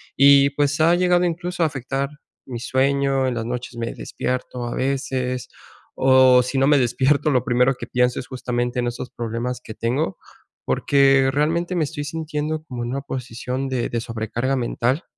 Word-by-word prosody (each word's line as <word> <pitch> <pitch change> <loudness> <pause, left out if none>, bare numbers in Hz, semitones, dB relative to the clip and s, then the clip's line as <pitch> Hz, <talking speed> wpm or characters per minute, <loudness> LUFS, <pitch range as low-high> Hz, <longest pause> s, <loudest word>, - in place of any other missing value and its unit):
Y 140 0 +6
pues 145 +1 0
ha 165 +2 +5
llegado 180 0 +3
incluso 175 +1 -2
a - - +4
afectar 135 -1 -2 0.4
mi 125 -3 -6
sueño, 135 +1 +1
en 130 - -1
las 115 -1 -3
noches 125 0 -5
me 115 0 -3
despierto 125 -1 -4
a 120 - -4
veces. 130 -2 -2 0.5
O 130 -1 +5
si 125 +2 -3
no 135 +1 +3
me 145 0 +5
despierto, 130 +4 +2
lo 125 -4 +2
primero 125 +1 +3
que - - -8
pienso 125 0 +1
es 125 - -13
justamente 125 -1 -2
en 120 - 0
estos 120 +1 -5
problemas 120 +2 -4
que 110 - -10
tengo, 120 +1 -1 0.5
porque 135 -1 +3
realmente 165 +6 0
me 170 - +1
estoy 150 0 -4
sintiendo 155 0 -3
como 125 -6 -6
en 120 - -4
una 140 +2 -2
posición 130 0 -4
de 130 -2 -1
de 120 - -2
sobrecarga 115 +3 -2
mental, 125 +4 -1
130 Hz, 180 wpm, -22 LUFS, 125-145 Hz, 0.5 s, Y